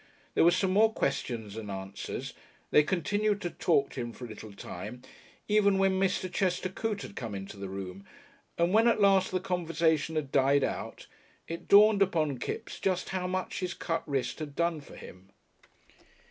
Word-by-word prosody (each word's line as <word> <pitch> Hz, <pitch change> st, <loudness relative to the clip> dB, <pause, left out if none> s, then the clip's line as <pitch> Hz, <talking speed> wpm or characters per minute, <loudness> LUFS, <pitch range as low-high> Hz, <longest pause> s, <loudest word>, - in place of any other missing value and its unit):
There -, -, +4 dB
was 175 Hz, +2 st, +5 dB
some 190 Hz, -1 st, +1 dB
more 220 Hz, +3 st, +5 dB
questions 120 Hz, -, -2 dB
and 110 Hz, -2 st, -6 dB
answers 95 Hz, 0 st, -5 dB, 0.4 s
they -, -, +7 dB
continued 205 Hz, +6 st, 0 dB
to 175 Hz, -, -3 dB
talk 140 Hz, -5 st, +1 dB
to 130 Hz, -, -4 dB
him 120 Hz, -1 st, -5 dB
for 125 Hz, -, -8 dB
a -, -, -7 dB
little 110 Hz, -1 st, -9 dB
time, 100 Hz, +5 st, -8 dB, 0.4 s
even 205 Hz, -2 st, +4 dB
when 190 Hz, -1 st, +2 dB
Mr. 185 Hz, -1 st, +1 dB
Chester 185 Hz, -1 st, 0 dB
Coote 210 Hz, +1 st, -3 dB
had -, -, -9 dB
come 115 Hz, -4 st, -5 dB
into 95 Hz, +1 st, -7 dB
the 100 Hz, -1 st, -6 dB
room 95 Hz, 0 st, -6 dB, 0.5 s
and 170 Hz, +2 st, +2 dB
when 225 Hz, +2 st, +5 dB
at 235 Hz, -, +3 dB
last 195 Hz, -2 st, +4 dB
the 185 Hz, -, 0 dB
conversation 165 Hz, -3 st, 0 dB
had 145 Hz, -4 st, -2 dB
died 140 Hz, +1 st, +4 dB
out -, -, -4 dB, 0.4 s
it 165 Hz, 0 st, -6 dB
dawned 205 Hz, 0 st, +7 dB
upon 155 Hz, -8 st, +1 dB
Kipps 230 Hz, -, -5 dB
just 185 Hz, -2 st, -1 dB
how 185 Hz, -1 st, -2 dB
much 185 Hz, 0 st, -3 dB
his 180 Hz, -1 st, -3 dB
cut 165 Hz, -1 st, -2 dB
wrist 135 Hz, +1 st, -1 dB
had 145 Hz, -2 st, -6 dB
done 170 Hz, -2 st, 0 dB
for -, -, -13 dB
him.... 90 Hz, +1 st, -12 dB
170 Hz, 185 wpm, -30 LUFS, 125-190 Hz, 0.5 s, they